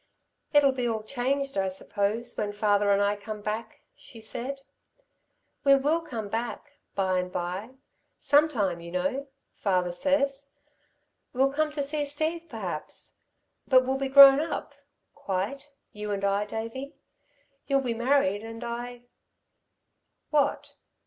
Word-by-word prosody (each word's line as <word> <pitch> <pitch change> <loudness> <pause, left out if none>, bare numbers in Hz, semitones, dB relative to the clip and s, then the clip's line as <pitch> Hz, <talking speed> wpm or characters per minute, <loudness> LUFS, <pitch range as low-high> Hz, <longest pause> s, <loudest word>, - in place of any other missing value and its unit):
"It'll 290 -2 +5
be 250 -2 -2
all 220 -2 -2
changed, 275 +4 -1
I 190 - +1
suppose, 205 +5 -1
when 205 -1 -2
father 205 -1 +2
and 200 0 +3
I 205 +1 +2
come 210 +1 -7
back," 215 +2 -5
she 245 - -11
said. 255 +5 -5 1.0
"We 275 -1 +7
will 295 +5 +1
come 235 -10 -5
back, 240 +7 -5 0.2
by 185 -2 +1
and 180 0 -4
by, 185 +9 -4 0.4
sometime, 240 - +2
you 170 - -8
know, 190 +11 -1 0.3
father 180 -3 0
says. 280 +6 0 0.8
We'll 270 +2 +2
come 310 +1 +1
to 290 -2 0
see 295 +1 0
Steve, 315 +4 -2
perhaps. 185 - -5 0.5
But 255 -2 +5
we'll 265 +1 0
be 270 -1 -1
grown 275 0 +10
up... 320 +2 -3 0.4
quite, 215 +10 -4 0.2
you 210 0 -6
and 200 -1 -1
I, 200 +1 +1
Davey. 230 +7 -6 0.7
You'll 275 -1 +3
be 245 -3 -1
married, 235 -4 +2
and 225 +1 -8
I 240 +1 -5 0.6
" - - -52
"What?" 285 -2 0
240 Hz, 140 wpm, -27 LUFS, 205-275 Hz, 1.0 s, grown